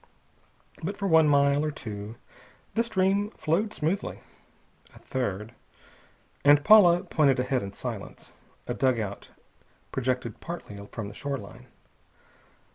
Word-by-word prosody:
But 195 Hz, +5 st, -4 dB
for 200 Hz, -, -2 dB
one 160 Hz, -3 st, +5 dB
mile, 140 Hz, 0 st, +4 dB
for 155 Hz, -, 0 dB
two, 105 Hz, -6 st, -7 dB, 0.6 s
the 225 Hz, -, +2 dB
stream 200 Hz, -2 st, +1 dB
flowed 180 Hz, +8 st, 0 dB
smoothly. 165 Hz, +4 st, -2 dB, 0.7 s
A -, -, -14 dB
third.... 105 Hz, -3 st, -4 dB, 0.9 s
And 145 Hz, 0 st, +6 dB
Paula 180 Hz, -3 st, +7 dB
pointed 140 Hz, -5 st, +2 dB
ahead 125 Hz, 0 st, 0 dB
in 100 Hz, 0 st, -6 dB
silence. -, -, -7 dB, 0.3 s
A 120 Hz, -, -3 dB
dug 130 Hz, -1 st, +1 dB
out 100 Hz, -2 st, -5 dB, 0.6 s
projected 125 Hz, -3 st, -2 dB
partly 170 Hz, -11 st, -7 dB, 0.2 s
from 110 Hz, -3 st, -5 dB
the 100 Hz, -, -9 dB
shoreline. 135 Hz, -4 st, -6 dB
140 Hz, 120 wpm, -27 LUFS, 120-170 Hz, 0.9 s, Paula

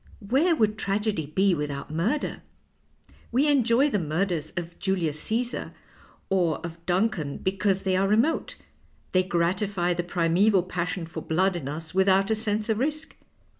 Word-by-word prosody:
^Vhcre 305 Hz, -, +3 dB
would 215 Hz, -1 st, +1 dB
tragedy 200 Hz, -5 st, -1 dB
be 190 Hz, +5 st, +2 dB
without 145 Hz, -2 st, -4 dB
murder? 215 Hz, -, -1 dB, 0.9 s
We 265 Hz, +5 st, +3 dB
enjoy 270 Hz, 0 st, +3 dB
the 205 Hz, -, +1 dB
murders 160 Hz, 0 st, -1 dB
of 170 Hz, -1 st, -5 dB
Julius 170 Hz, -6 st, -1 dB
Casar 240 Hz, +3 st, -2 dB, 0.5 s
or 175 Hz, -6 st, +1 dB
of 170 Hz, 0 st, -9 dB
Duncan 180 Hz, -6 st, 0 dB
because 195 Hz, 0 st, 0 dB
they 190 Hz, -1 st, +1 dB
are 195 Hz, +1 st, +2 dB
re 210 Hz, -, +4 dB
mote; 305 Hz, +8 st, +1 dB, 0.6 s
they 185 Hz, -, +4 dB
gratify 180 Hz, +1 st, 0 dB
the 175 Hz, -, -1 dB
primeval 175 Hz, +3 st, +2 dB
passion 180 Hz, -1 st, -3 dB
for 160 Hz, 0 st, -7 dB
blood 185 Hz, +5 st, +1 dB
in 155 Hz, -6 st, -4 dB
us 160 Hz, +3 st, -5 dB
without 190 Hz, +2 st, +3 dB
a -, -, +3 dB
sense 215 Hz, -1 st, -1 dB
of 220 Hz, -1 st, 0 dB
risk. 310 Hz, +4 st, -2 dB
190 Hz, 155 wpm, -26 LUFS, 170-215 Hz, 0.9 s, re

